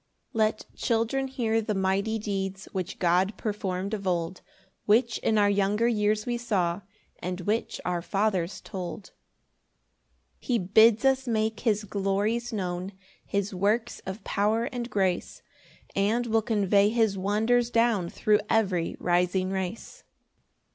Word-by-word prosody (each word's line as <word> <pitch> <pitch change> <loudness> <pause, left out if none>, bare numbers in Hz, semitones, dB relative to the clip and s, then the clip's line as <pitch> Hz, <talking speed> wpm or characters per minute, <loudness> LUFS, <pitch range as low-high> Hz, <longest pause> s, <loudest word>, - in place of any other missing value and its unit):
1 225 - -4
Let 215 0 -3
children 235 +3 0
hear 230 -4 0
the 215 -1 -2
mighty 195 +3 0
deeds, 195 -2 -4
Which 185 -2 -4
God 185 +3 +2
perform'd 200 -2 -3
of 200 -3 -3
old, 175 0 -1 0.5
Which 230 +2 +3
in 220 - +1
our 205 -1 +5
younger 205 +3 +2
years 210 -2 +1
we 240 -1 -2
saw, 190 -6 0 0.4
And 180 +1 -4
which 210 +5 -1
our 180 -1 -1
fathers 195 -1 -1
told. 190 0 -7
2 - - -37 1.3
He 245 - 0
bids 220 +5 +5
us 265 0 +2
make 220 -1 0
his 215 -3 +1
glories 205 +4 -1
known, 185 -2 -3 0.3
His 200 0 -1
works 205 +5 0
of 190 +2 -6
power 215 +3 +1
and 245 -1 -4
grace; 190 -5 -1 0.5
And 215 +5 +1
we'll 225 -1 +2
convey 205 -2 +3
his 220 -3 +2
wonders 220 +5 +1
down 230 -7 +2
Thro' 210 +2 +2
every 190 -6 +1
rising 180 +1 +1
race. 195 - -5
205 Hz, 140 wpm, -27 LUFS, 190-225 Hz, 1.3 s, our